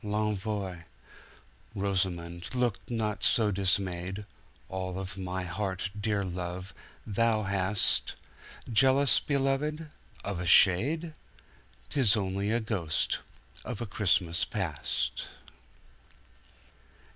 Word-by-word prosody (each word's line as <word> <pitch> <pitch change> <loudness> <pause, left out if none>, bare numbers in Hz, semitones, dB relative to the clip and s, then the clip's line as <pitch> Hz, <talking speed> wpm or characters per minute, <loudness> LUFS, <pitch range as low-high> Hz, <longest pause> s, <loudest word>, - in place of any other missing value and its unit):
L'ENVOIRosamond! 95 - -4
look 120 -6 +1
not 110 -3 -2
so 110 -3 +4
dismayed, 95 0 -1 0.4
All 95 -1 -4
of 95 0 -5
my 95 -1 -3
heart, 95 +1 -3
dear 105 -1 0
love, 90 +1 -5 0.3
thou 110 +1 +1
hastJealous, 110 +6 +2
beloved? 150 +2 0 0.3
Of 100 -3 -3
a 90 - -3
shade?— 140 - +5 0.8
'Tis 115 -6 +4
only 100 0 -1
a 115 +2 +2
ghost 100 -9 -1 0.4
of 125 -5 -5
a 120 - -3
Christmas 90 -4 +1
Past. 90 -10 -2
100 Hz, 85 wpm, -29 LUFS, 95-110 Hz, 0.8 s, shade